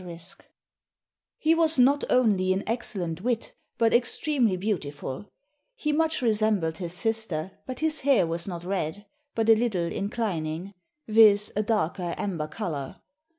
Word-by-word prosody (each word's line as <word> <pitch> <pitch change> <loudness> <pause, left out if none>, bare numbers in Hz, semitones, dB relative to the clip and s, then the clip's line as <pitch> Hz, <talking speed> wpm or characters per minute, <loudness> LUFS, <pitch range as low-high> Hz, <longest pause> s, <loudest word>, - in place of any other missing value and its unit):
*] - - -12 1.3
"He 315 +1 +3
was 325 -2 +3
not 275 +3 +4
only 200 -7 +3
an 190 - -2
excellent 185 -8 -2
witt, 235 +1 -2 0.2
but 230 -1 +2
extremely 240 -3 +1
beautiful; 155 -4 -4 0.5
he 300 -11 -1
much 320 -2 +1
resembled 215 -7 +1
his 175 -2 -3
sister 220 -6 -1 0.2
but 255 +1 -6
his 315 -1 +4
haire 265 -9 +4
was 170 +2 -3
not 175 -3 -5
red, 190 +1 -3 0.3
but 225 -1 0
a 225 - +8
little 215 -6 0
inclining; 195 -4 -3 0.3
viz., 215 -2 +5
a 210 - +1
darke 210 -5 -1
amber 175 -2 -3
colour. 155 -7 -5
210 Hz, 140 wpm, -26 LUFS, 175-235 Hz, 1.3 s, a